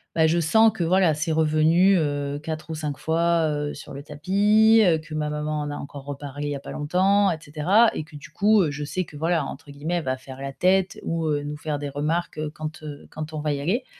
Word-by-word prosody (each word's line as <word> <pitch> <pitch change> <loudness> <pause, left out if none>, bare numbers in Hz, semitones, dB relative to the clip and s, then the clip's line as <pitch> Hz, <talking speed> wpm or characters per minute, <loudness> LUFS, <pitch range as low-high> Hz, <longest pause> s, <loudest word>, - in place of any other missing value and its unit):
ben 160 -1 +4
je 170 +2 +2
sens 220 +8 +5
que 175 - -2
voilà, 180 -1 +3
c'est 150 +2 -2
revenu, 160 +4 +4
heu, 145 -2 -1
4 155 0 -5
ou 160 - -3
5 150 -2 -4
fois, 165 0 +1
heu, 145 0 -2
sur - - -10
le 140 +1 -8
tapis, 205 +9 +4
heu. 165 -3 +4
Que 155 0 -11
ma 150 -1 -1
maman 150 0 -2
en 145 0 -4
a - - -4
encore 140 -1 -8
reparlé 145 0 -6
il - - -2
y - - -2
a - - -5
pas - - -9
longtemps, 190 +6 +2
et 160 - -2
cetera 175 +10 +3
et 155 - -4
que 150 -1 -12
du 145 - -13
coup, 210 +4 +4
heu, 150 - -1
je 145 +1 -5
sais 185 +4 -3
que 150 - -14
voilà, 160 -1 0
entre 145 +1 -9
guillemets, 155 +5 -3
«Elle 170 - -1
va 130 0 -1
faire 130 +1 -11
la 140 0 -4
tête» 185 +4 +1
ou, 165 -1 -2
heu, 145 -1 0
nous 150 0 -5
faire 145 -1 -3
des 145 -1 -4
remarques, 155 +4 -2
heu, 155 -1 -3
quand, 155 +1 -7
heu, 145 -2 -9
quand 155 0 -6
on 155 - -3
va 150 -1 -1
y 140 - -3
aller, 230 - -1
155 Hz, 260 wpm, -24 LUFS, 145-175 Hz, -, sens